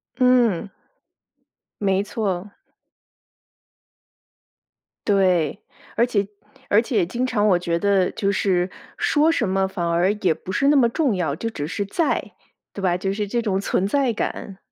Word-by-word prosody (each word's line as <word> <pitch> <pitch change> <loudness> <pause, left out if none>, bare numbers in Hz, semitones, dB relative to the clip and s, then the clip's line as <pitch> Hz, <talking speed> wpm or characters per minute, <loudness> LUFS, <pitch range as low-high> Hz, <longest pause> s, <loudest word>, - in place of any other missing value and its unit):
嗯。 245 -7 +3 1.1
没 195 -1 +2
错。 200 -3 -3 2.6
对， 185 -4 +2 0.3
而 235 - +4
且 200 -5 0 0.4
而 210 +2 +4
且 220 -7 0
经 245 +8 -2
常 215 -4 +1
我 180 -3 +4
觉 170 -1 -1
得 195 -2 +2
就 200 -3 -1
是， 185 -2 +1 0.3
说 310 +2 +3
什 235 -10 0
么 190 0 +1
反 185 -3 -3
而 175 +3 +2
也 180 -5 +2
不 185 - -9
是 275 +5 +1
那 295 - +5
么 240 -4 +4
重 265 - 0
要。 160 -6 -1
就 225 +9 -3
只 145 -9 -5
是 200 +5 -3
在， 315 - -1 0.4
对 200 - -6
吧？ 180 -2 +1
就 195 +1 -2
是 210 0 -2
这 235 +4 -1
种 195 -3 -1
存 195 -1 0
在 270 +1 +1
感。 200 -2 -4
200 Hz, 165 characters per minute, -22 LUFS, 185-230 Hz, 2.6 s, 那